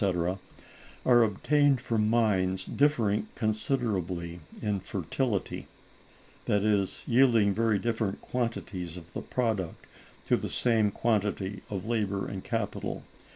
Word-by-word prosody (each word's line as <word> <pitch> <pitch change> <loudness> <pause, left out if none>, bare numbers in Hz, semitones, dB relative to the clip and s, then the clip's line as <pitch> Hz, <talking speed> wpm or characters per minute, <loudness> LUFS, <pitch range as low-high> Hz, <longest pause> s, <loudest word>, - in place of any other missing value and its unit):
—are 120 -1 +6
obtained 140 +6 +3
from 110 -4 0
mines 95 -5 +2
differing 115 -8 +2
considerably 105 - -1 0.2
in 105 -2 -1
fertility—that 100 - -4
is, 100 -3 +1
yielding 115 -5 +4
very 110 0 +2
different 110 -2 -1
quantities 100 -8 -3
of 85 0 -12
the - - -3
product 110 -9 -2 0.4
to - - +3
the - - -3
same 115 -4 +2
quantity 100 -3 -1
of 100 -2 -4
labor 100 -4 0
and 95 -2 -5
capital. 115 -4 -3
105 Hz, 110 wpm, -29 LUFS, 95-115 Hz, 0.4 s, are